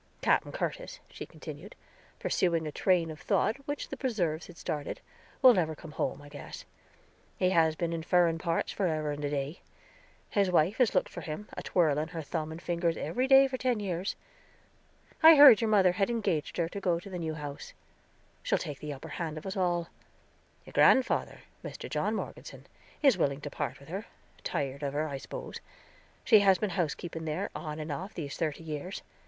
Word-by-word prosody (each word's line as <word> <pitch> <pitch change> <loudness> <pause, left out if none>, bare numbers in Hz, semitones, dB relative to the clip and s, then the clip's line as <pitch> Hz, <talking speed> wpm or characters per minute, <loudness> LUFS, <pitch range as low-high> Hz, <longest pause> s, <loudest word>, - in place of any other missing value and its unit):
"Capen - - +2
Curtis," - - -4
she - - -8
continued, - - -10 0.4
pursuing 170 -3 +1
a 150 - -3
train 170 -1 +2
of 155 - -9
thought 220 - +1
which 290 0 -4
the - - -4
preserves 175 - -1
had 175 - -13
started, 150 -2 -4 0.4
"will 255 -1 +10
never 160 -6 0
come 155 +1 -11
home, 145 0 -3
I - - -12
guess. 145 0 -9 0.7
He 185 0 +2
has 160 -3 +3
been 170 0 -2
in 165 - -3
furen 170 -1 +3
parts 165 0 -1
forever 155 -6 -1
and 145 0 -5
a 145 - 0
day; 145 +2 -3 0.7
his 200 -2 +2
wife 180 +3 +3
has 245 -6 +3
looked 185 - +2
for - - -8
him, 160 +7 -6
a - - -5
twirling 155 -3 +1
her 165 -1 -6
thumb 155 +1 -3
and 160 - -7
fingers, 170 -1 -1
every 250 - -1
day 270 0 +7
for 260 -1 -4
ten 250 -3 +1
years. 185 -1 -2 1.1
I 320 0 +10
heard 280 -7 +9
your 225 - +1
mother 195 -4 +5
had 195 +3 0
engaged 210 -10 -1
her 170 - +1
to 200 - -6
go 180 -3 +2
in 190 +3 -9
the 180 - -4
new 160 -2 -3
house; 145 -2 -7 0.7
she'll - - +1
take 145 -2 -6
the 150 -1 -5
upper 135 - -9
hand 160 -2 -4
of 155 - -8
us 190 - -4
all. 175 -3 0 0.8
Your - - -13
grandfather, 260 -1 +3 0.2
Mr. - - -7
John - - -1
Morgeson, - - -7 0.4
is 265 -10 +5
willing 140 -2 0
to - - -6
part - - -4
with - - -15
her; - - -5 0.4
tired 140 0 -3
of 140 -1 -2
her, 155 +2 0
I 140 -2 -4
spose. - - -7 0.6
She 220 - +7
has 195 -2 +5
been 205 +1 -2
housekeeping 165 -1 -3
there, 165 +6 -2
off 150 -2 -5
and 155 0 -5
on, 180 +7 -4
these 145 -4 -5
thirty 160 -1 -2
years. 160 +4 -5
170 Hz, 195 wpm, -30 LUFS, 155-195 Hz, 1.1 s, will